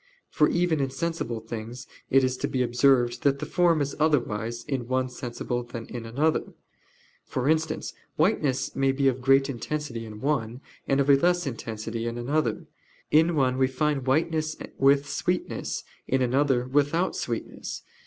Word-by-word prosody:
For 150 - +3
even 175 -3 +1
in 135 -1 0
sensible 135 -4 -3
things 115 +2 -7 0.2
it 135 0 +5
is 130 0 +1
to - - -1
be 130 -1 0
observed 125 0 +3
that 140 -1 +3
the 150 - -4
form 170 -3 +3
is 140 0 -2
otherwise 120 -6 0
in 130 -4 -3
one 130 0 0
sensible 120 0 -4
than 120 -1 -7
in 115 -2 -7
another: 145 +7 0 0.7
for 130 +1 -2
instance, 160 0 0 0.2
whiteness 150 - +1
may 135 0 +2
be 135 0 +2
of 130 -1 +1
great 135 +1 +4
intensity 140 -2 -4
in 105 -1 -9
one, 125 -3 -1 0.3
and 135 - +2
of 140 - +2
a 140 - +7
less 175 +3 +2
intensity 115 -2 -4
in 115 0 -3
another: 120 -1 -1 0.5
in 160 +2 +4
one 130 -3 +2
we 130 - +4
find 135 0 -1
whiteness 155 +2 +1 0.2
with 140 +1 +4
sweetness, 180 +4 -2 0.2
in 130 0 +2
another 130 0 +2
without 145 +7 +1
sweetness. - - -5
135 Hz, 165 wpm, -26 LUFS, 120-150 Hz, 0.7 s, a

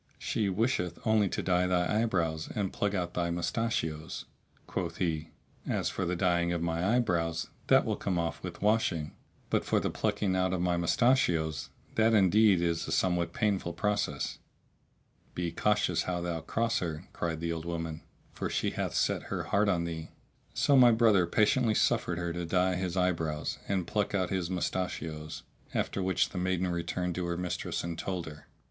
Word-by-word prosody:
She 105 -3 -1
wisheth 95 -4 0
only 110 -3 +3
to - - -2
dye 90 0 +2
thy 90 +4 +2
eyebrows 85 -8 0
and 100 -3 -1
pluck 105 0 0
out 90 -2 -2
thy 85 -1 0
mustachios." 85 -3 -2 0.4
Quoth 85 -2 -3
he, 80 -3 -1 0.4
"As - - 0
for - - -2
the 90 +1 -1
dyeing 85 -1 +2
of 85 - 0
my 85 +6 +1
eye - - +5
brows, 85 -6 -1 0.2
that - - +5
will - - -1
come 95 -3 -1
off 85 -2 -2
with 90 0 -7
washing,[FN#645] 100 -8 +1 0.4
but - - +2
for - - +2
the - - -1
plucking 105 -3 0
out 95 0 +1
of 95 - 0
my 90 -1 +2
mustachios, 85 - +2 0.2
that 110 0 +4
indeed 100 -1 +5
is 85 -1 0
a - - -4
somewhat 90 -2 +1
painful 100 -4 0
process." 105 -1 -1 1.0
"Be 85 -1 -2
cautious 105 +4 +1
how 90 -1 -2
thou 85 -1 -2
cross 115 +5 0
her," 80 -2 -4
cried 80 -2 -2
the 85 0 -2
old 80 0 -5
woman; 80 -2 -4 0.3
"for - - -3
she - - 0
hath - - -3
set - - +1
her - - -2
heart 100 +1 +2
on 85 -3 +1
thee." 80 -1 -5 0.5
So 140 - +4
my 125 -2 +8
brother 110 -6 +4
patiently 110 +4 +3
suffered 85 - +2
her 85 -1 -2
to 85 0 -3
dye 90 +1 +2
his 90 0 -2
eyebrows 80 -4 0
and 95 -3 0
pluck 105 +2 -1
out 95 -3 0
his 95 -3 -1
mustachios, 80 -4 -3 0.3
after 100 - -1
which 95 0 +1
the 90 - -4
maiden 95 0 0
returned 90 +1 -2
to 90 0 -2
her 85 0 -2
mistress 90 0 -3
and 85 -1 -4
told 90 -3 -3
her. 75 -1 -11
90 Hz, 180 wpm, -30 LUFS, 85-100 Hz, 1.0 s, my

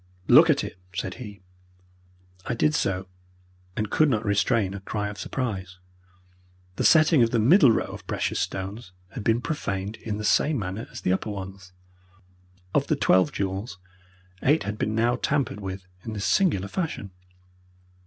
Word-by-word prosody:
"Look - - +8
at - - +3
it," - - -7 0.2
said 95 0 -3
he. 105 -5 -9 1.1
I - - -1
did 150 +6 +2
so, 95 -8 -1 0.7
and 105 0 -2
could 155 -1 +4
not 110 -4 0
restrain 100 0 +1
a 100 - -5
cry 105 +1 -3
of 105 - -9
surprise. 95 -8 -4 1.0
The - - 0
setting 155 -3 +6
of 115 - +4
the 115 - 0
middle 135 - +6
row - - +1
of - - -10
precious - - -1
stones 95 +2 -4 0.2
had 115 +1 -7
been 115 +3 +2
profaned 105 -9 -3
in 105 -2 -4
the 105 - -5
same 150 +7 +3
manner 95 +1 -4
as - - -9
the 90 - +1
upper 95 - -2
ones. 95 -2 -7 1.0
Of - - +2
the - - +2
twelve 95 0 +3
jewels 100 +1 -3 0.6
eight 150 +4 +3
had 105 +1 -5
been 110 - -1
now 120 +2 +2
tampered 140 -8 -1
with 95 -1 -6 0.2
in 110 - -5
this 105 -1 -3
singular 110 - +2
fashion. 130 - -4
105 Hz, 165 wpm, -25 LUFS, 95-120 Hz, 1.1 s, Look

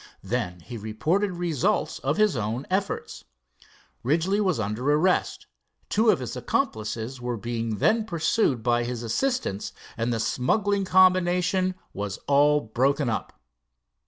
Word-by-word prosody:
Then 90 0 -3
he 120 +6 -8
reported 155 - 0
results 170 -6 0
of 140 +3 -1
his 215 -6 +3
own 115 +4 -2
efforts. 195 +1 -2 0.8
Ridgely 170 - +1
was 185 - +1
under 110 +7 -1
arrest, 170 +5 +1 0.4
two 220 +2 +3
of - - +5
his 125 - -5
accomplices 110 +3 -2
were 120 -1 -2
being 115 0 -3
then 220 - +2
pursued 165 - +1
by 120 0 +2
his 120 -1 -4
assistants, 120 - -1 0.2
and 115 +1 -1
the 115 - -1
smuggling 195 - +1
combination 185 0 +3 0.2
was 100 -1 -4
all 145 +1 +4
broken 130 +3 +1
up. - - -5
140 Hz, 130 wpm, -26 LUFS, 115-185 Hz, 0.8 s, of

